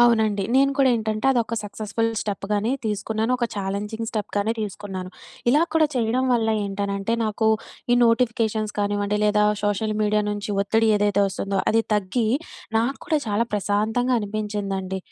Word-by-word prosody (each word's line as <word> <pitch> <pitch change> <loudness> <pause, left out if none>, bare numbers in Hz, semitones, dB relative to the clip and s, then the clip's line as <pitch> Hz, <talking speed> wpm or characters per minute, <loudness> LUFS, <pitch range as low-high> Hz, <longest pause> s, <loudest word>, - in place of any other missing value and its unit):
అవునండి 220 -4 +3
నేను 275 +1 +5
కూడా 270 -1 +5
ఏంటంటే 220 +1 -1
అది 260 - +2
ఒక 230 - -5
సక్సెస్ఫుల్ 215 +2 -2
స్టెప్ 200 -2 -4
గానే 210 +4 +1
తీసుకున్నాను, 220 +2 -1
ఒక 245 - 0
ఛాలెంజింగ్ 205 +3 -3
స్టెప్ 215 -2 -4
గానే 205 +2 +1
తీసుకున్నాను 195 -3 -5 0.4
ఇలా 295 +5 +4
కూడా 320 -1 +5
చేయడం 245 +1 +1
వల్ల 225 -2 +2 0.2
ఏంటనంటే 200 +1 -2
నాకు 220 +1 0 0.5
ఈ - - +7
నోటిఫికేషన్స్ 230 -2 +1
కానివ్వండి 205 0 0
లేదా 210 0 +3 0.2
సోషల్ 210 +1 0
మీడియా 210 0 +2
నుంచి 205 0 -4
ఒత్తిడి 225 +3 +2
ఏదైతే 205 0 +2
వస్తుందో 195 +1 -2
అది 225 - +4
తగ్గి, 210 +3 0 0.5
నాకు 240 +5 0
కూడా 310 - +2
చాలా 210 +2 +1
ప్రశాంతంగా 215 +5 +1
అనిపించిందండి. 200 -3 -3
215 Hz, 150 wpm, -23 LUFS, 205-225 Hz, 0.5 s, ఈ